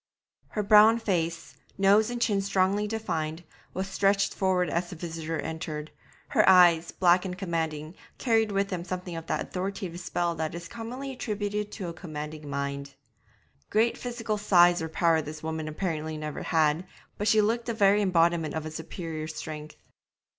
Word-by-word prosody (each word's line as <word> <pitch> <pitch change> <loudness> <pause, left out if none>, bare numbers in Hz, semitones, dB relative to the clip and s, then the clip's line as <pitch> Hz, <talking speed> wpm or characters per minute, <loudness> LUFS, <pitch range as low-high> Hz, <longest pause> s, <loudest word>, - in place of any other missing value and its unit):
Her 210 - -2
brown 215 +2 +7
face 170 -6 -2 0.2
nose 200 +3 +4
and 245 0 -3
chin 210 -4 +2
strongly 195 +1 +1
defined 170 -7 -3 0.3
was 190 +1 -2
stretched 195 0 +2
forward 185 -2 +1
as 170 +3 -1
the - - -7
visitor 165 -1 -4
entered; 155 -1 -5 0.4
her - - +4
eyes, 175 -3 +6
black 180 0 +4
and 180 -1 -5
commanding, 160 -3 -3 0.2
carried 225 -3 +2
with 200 0 0
them 180 -3 -3
something 180 -1 -5
of 165 -1 -7
that - - -1
authoritative 185 -2 -4
spell 175 -1 -1
that 160 +1 -3
is 170 0 -7
commonly 245 +4 -6
attributed 210 -4 -3
to 190 -4 -5
a - - -6
commanding 150 -3 -7
mind. 140 0 -4 0.7
Great 225 +2 +2
physical 230 -3 -3
size 175 -3 +5
or 160 - -3
power 165 0 +2
this 155 +1 -8
woman 160 -1 -3
apparently 155 -1 -3
had 155 - -6
never 150 -1 -5
had, 160 +2 +1 0.3
but 205 - -1
she 220 +1 +5
looked 230 +3 +1
the 235 - -1
very 205 -1 +4
embodiment 170 -4 +2
of 160 -1 -3
a 155 - -5
superior 160 0 -6
strength. 155 -1 -7
175 Hz, 170 wpm, -28 LUFS, 160-205 Hz, 0.7 s, brown